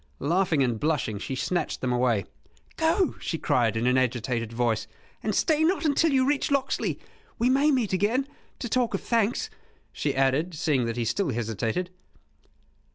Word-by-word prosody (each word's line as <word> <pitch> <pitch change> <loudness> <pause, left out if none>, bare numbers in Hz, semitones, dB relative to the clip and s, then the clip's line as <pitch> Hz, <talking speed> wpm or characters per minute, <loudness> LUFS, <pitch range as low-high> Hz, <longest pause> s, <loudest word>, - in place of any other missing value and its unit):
Laughing 165 -1 +1
and 120 -3 -1
blushing, 140 -9 -1
she 130 - -4
snatched 175 +7 -2
them 125 -1 -1
away. 120 -5 +1 0.5
"Go," 325 +3 +1
she 165 - -2
cried, 115 -7 +1
in 125 +3 +2
agitated 120 -2 -1
voice, 115 -1 0 0.3
"and - - -1
stay 315 -1 +2
not 345 +1 +1
until 310 +2 +3
you 260 -1 +3
reach 285 +1 +1
Locksley. 280 -2 0 0.4
We 245 +2 +2
may 275 +3 +4
meet 250 -9 +1
again 225 +8 +1 0.3
to 240 - -4
talk 245 0 +1
of - - -3
thanks," 235 - 0 0.4
she 145 - -2
added, 135 +6 +1
seeing 145 -5 +1
that 115 0 -3
he 120 - -1
still 170 - 0
hesitated. 115 - -2
160 Hz, 160 wpm, -26 LUFS, -, 0.5 s, may